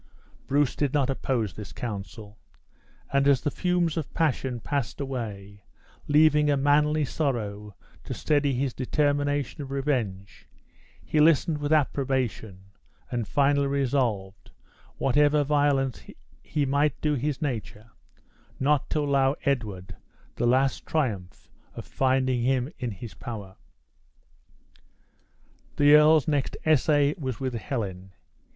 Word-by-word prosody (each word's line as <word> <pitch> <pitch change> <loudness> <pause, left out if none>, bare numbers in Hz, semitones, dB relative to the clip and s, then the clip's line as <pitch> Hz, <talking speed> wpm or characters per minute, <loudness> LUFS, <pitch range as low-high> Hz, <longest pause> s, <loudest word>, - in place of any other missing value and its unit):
Bruce 140 -1 +1
did 145 -1 -1
not 140 -2 +2
oppose 120 -7 -2
this 105 +1 -9
counsel; 105 -1 -7 0.7
and 140 0 +3
as 140 -3 +4
the 145 - -1
fumes 175 -2 0
of 155 - -4
passion 135 -6 0
passed 140 +1 -3
away, 105 -7 -6 0.4
leaving 150 0 +4
a 145 - +3
manly 150 +2 +2
sorrow 105 - -3 0.3
to - - -9
steady 145 -3 +1
his 130 0 -1
determination 145 +1 -1
of 140 - -7
revenge, 120 -9 -3 0.6
he 155 - 0
listened 155 0 +3
with 145 +1 -3
approbation, 130 -9 0 0.5
and 120 -4 -2
finally 140 +5 +2
resolved, 120 -8 -1 0.5
whatever 145 +2 +3
violence 145 -3 +1 0.4
he 145 -2 -1
might 140 +1 +1
do 150 -1 0
his 145 +1 -2
nature, 115 -6 -5 0.7
not 140 +1 +1
to 155 - 0
allow 140 -1 +2
Edward 105 -9 -2 0.4
the 120 - 0
last 130 +2 +2
triumph 110 - -2 0.3
of - - -7
finding 130 -1 +1
him 130 +4 0
in 125 - -2
his 105 +2 -8
power. 100 -5 -8 2.2
The 145 0 +5
earl's 150 -2 +6
next 145 -3 -1
essay 145 -1 +3
was 130 -6 -4
with 130 -2 -3
Helen. 100 -6 -5
135 Hz, 120 wpm, -26 LUFS, 115-145 Hz, 2.2 s, earl's